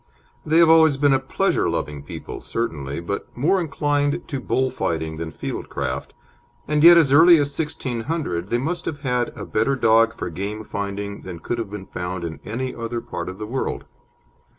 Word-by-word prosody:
They 160 Hz, +2 st, +2 dB
have 165 Hz, -1 st, +7 dB
always 160 Hz, -3 st, +6 dB
been 145 Hz, 0 st, +4 dB
a 135 Hz, -, +3 dB
pleasure 135 Hz, -, 0 dB
loving 75 Hz, -1 st, -3 dB
people, 70 Hz, -, -8 dB
certainly, 75 Hz, -10 st, -3 dB
but 95 Hz, +4 st, -4 dB
more 180 Hz, +9 st, +2 dB
inclined 145 Hz, 0 st, 0 dB
to 140 Hz, -, -2 dB
bull 130 Hz, 0 st, 0 dB
fighting 80 Hz, -1 st, -2 dB
than 80 Hz, 0 st, -4 dB
field -, -, -6 dB
craft, -, -, -4 dB, 0.5 s
and 150 Hz, 0 st, +1 dB
yet 170 Hz, +1 st, +10 dB
as 155 Hz, -5 st, +4 dB
early 170 Hz, +4 st, +8 dB
as 145 Hz, -1 st, 0 dB
1600 130 Hz, -, -3 dB
they 120 Hz, -, +2 dB
must 160 Hz, +8 st, -3 dB
have 145 Hz, -2 st, -4 dB
had 125 Hz, -3 st, 0 dB
a -, -, -6 dB
better 125 Hz, +6 st, +1 dB
dog 115 Hz, -2 st, +4 dB
for 85 Hz, -, -5 dB
game 100 Hz, +6 st, -4 dB
finding 100 Hz, 0 st, -4 dB
than 90 Hz, -2 st, -7 dB
could 120 Hz, +8 st, -3 dB
have 110 Hz, -3 st, -4 dB
been 100 Hz, -2 st, -7 dB
found 90 Hz, 0 st, -5 dB
in 80 Hz, -4 st, -5 dB
any 125 Hz, +4 st, -3 dB
other 115 Hz, 0 st, -4 dB
part 85 Hz, -6 st, -5 dB
of 95 Hz, -, -8 dB
the 105 Hz, -, -5 dB
world. 130 Hz, +5 st, -3 dB
120 Hz, 190 wpm, -22 LUFS, 95-145 Hz, 0.5 s, yet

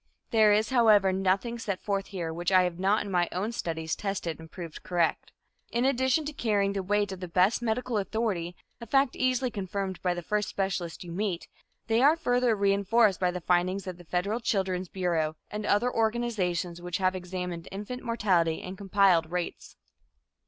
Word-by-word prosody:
There 220 Hz, -2 st, +5 dB
is, 215 Hz, +4 st, +2 dB
however, 215 Hz, -6 st, +5 dB
nothing 195 Hz, +5 st, 0 dB
set 200 Hz, -5 st, -3 dB
forth 195 Hz, -1 st, -2 dB
here 170 Hz, -5 st, -4 dB
which 175 Hz, +2 st, -2 dB
I 185 Hz, -1 st, +6 dB
have 180 Hz, -1 st, -2 dB
not 200 Hz, +3 st, +2 dB
in 200 Hz, -, -6 dB
my 175 Hz, -1 st, +2 dB
own 200 Hz, +5 st, -2 dB
studies 160 Hz, -7 st, -3 dB
tested 195 Hz, -6 st, -3 dB
and 160 Hz, 0 st, -11 dB
proved 170 Hz, -4 st, -8 dB
correct. 175 Hz, -2 st, 0 dB, 0.4 s
In 240 Hz, +2 st, 0 dB
addition 260 Hz, +3 st, +2 dB
to 300 Hz, -, -4 dB
carrying 205 Hz, -6 st, +1 dB
the 195 Hz, -, -1 dB
weight 205 Hz, +1 st, 0 dB
of 190 Hz, -, -6 dB
the 180 Hz, -, -5 dB
best 185 Hz, +7 st, +2 dB
medical 235 Hz, 0 st, -1 dB
authority, 195 Hz, -4 st, -2 dB, 0.2 s
a 235 Hz, -, -9 dB
fact 270 Hz, +2 st, +2 dB
easily 255 Hz, 0 st, +1 dB
confirmed 195 Hz, -2 st, -4 dB
by 180 Hz, -1 st, 0 dB
the 175 Hz, -, -5 dB
first 210 Hz, +4 st, -1 dB
specialist 190 Hz, -4 st, -3 dB
you 175 Hz, -, -9 dB
meet, 185 Hz, -1 st, -2 dB, 0.4 s
they 225 Hz, +1 st, +2 dB
are 290 Hz, +4 st, +6 dB
further 245 Hz, -6 st, +2 dB
reinforced 200 Hz, +1 st, +3 dB
by 180 Hz, -, +2 dB
the 180 Hz, 0 st, -4 dB
findings 185 Hz, +3 st, +1 dB
of 185 Hz, -2 st, -6 dB
the -, -, -11 dB
federal 180 Hz, +7 st, -1 dB
Children's 190 Hz, -5 st, -1 dB
Bureau, 165 Hz, -4 st, -1 dB, 0.2 s
and 210 Hz, 0 st, -4 dB
other 240 Hz, +5 st, +2 dB
organizations 210 Hz, -7 st, -1 dB
which 175 Hz, -1 st, -3 dB
have 185 Hz, -1 st, +1 dB
examined 180 Hz, -2 st, -5 dB
infant 210 Hz, +6 st, -6 dB
mortality 190 Hz, -9 st, +1 dB
and 185 Hz, +1 st, -7 dB
compiled 195 Hz, -5 st, +3 dB
rates. 180 Hz, -1 st, -4 dB
195 Hz, 185 wpm, -28 LUFS, 180-220 Hz, 0.4 s, I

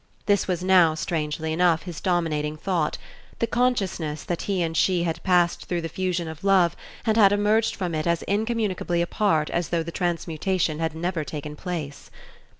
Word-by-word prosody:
This 200 Hz, -1 st, +2 dB
was 180 Hz, -1 st, -1 dB
now, 180 Hz, -4 st, +5 dB
strangely 155 Hz, 0 st, -2 dB
enough, 170 Hz, -1 st, +3 dB
his 175 Hz, -4 st, -7 dB
dominating 155 Hz, -4 st, 0 dB
thought: 165 Hz, -2 st, -1 dB, 0.4 s
the -, -, +1 dB
consciousness 195 Hz, -11 st, -1 dB
that 175 Hz, -, -3 dB
he 190 Hz, -3 st, +1 dB
and 165 Hz, -1 st, -2 dB
she 180 Hz, +1 st, +2 dB
had 165 Hz, -1 st, -2 dB
passed 175 Hz, -2 st, +2 dB
through 175 Hz, -1 st, -2 dB
the 165 Hz, -, -4 dB
fusion 180 Hz, 0 st, -2 dB
of 160 Hz, +1 st, -8 dB
love 190 Hz, -4 st, +4 dB, 0.3 s
and 220 Hz, -1 st, +2 dB
had 200 Hz, -3 st, +7 dB
emerged 210 Hz, +2 st, +2 dB
from 180 Hz, -3 st, -3 dB
it 155 Hz, +1 st, -1 dB
as 170 Hz, -1 st, +1 dB
incommunicably 205 Hz, -5 st, 0 dB
apart 170 Hz, -4 st, +1 dB
as 170 Hz, -2 st, -1 dB
though 170 Hz, -1 st, 0 dB
the 170 Hz, -, -6 dB
transmutation 170 Hz, -1 st, -1 dB
had 160 Hz, -1 st, -2 dB
never 170 Hz, 0 st, -2 dB
taken 150 Hz, +2 st, -6 dB
place. 150 Hz, -5 st, -6 dB
175 Hz, 175 wpm, -25 LUFS, 160-190 Hz, 0.4 s, had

